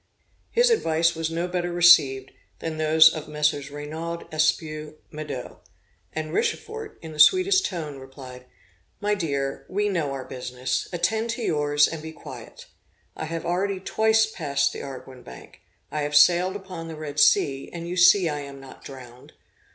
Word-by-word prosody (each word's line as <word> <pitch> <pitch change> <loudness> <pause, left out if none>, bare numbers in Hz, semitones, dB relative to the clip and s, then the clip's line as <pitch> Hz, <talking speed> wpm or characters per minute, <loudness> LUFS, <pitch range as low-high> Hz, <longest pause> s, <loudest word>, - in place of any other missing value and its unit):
His 480 +1 +3
advice 165 - +2
was 165 0 -3
no 170 +2 -2
better 175 -1 -2
received 140 -7 +5 0.3
than 160 -1 -5
those 155 +1 +6
of 155 -1 -6
Messrs. 150 -2 -1
Reynaud, 160 +4 -6
Espiau, 155 -1 -1 0.2
Maudet, 150 -5 -7 0.6
&c. 160 - -1
Richefort, 435 - -3
in 160 - -8
the 155 - -10
sweetest 380 - +5
tone, 155 -6 -6
replied, 130 -1 -12 0.5
'My 210 0 0
dear, 140 -8 -2
we 205 +2 0
know 165 -7 -1
our 135 -1 -5
business; 125 0 -4
attend 220 +6 -1
to 235 +1 -3
yours, 145 -4 +2
and 160 -2 -6
be 160 0 -8
quiet. - - -11 0.5
I - - -5
have 165 +1 -5
already 190 +2 -1
twice 220 +3 +2
passed 155 -10 -1
the - - -7
Arguin 130 -1 -9
Bank; 65 0 -13 0.3
I 150 - -2
have 145 0 -2
sailed 180 +5 +5
upon 185 -4 -8
the 165 - -7
Red 150 -1 -5
Sea, 135 -1 +3
and 170 -1 -7
you 175 - -4
see 180 0 +6
I 150 -2 -2
am 140 -1 -9
not 135 -1 -14
drowned.' 125 -2 -12
155 Hz, 165 wpm, -24 LUFS, 145-180 Hz, 0.6 s, those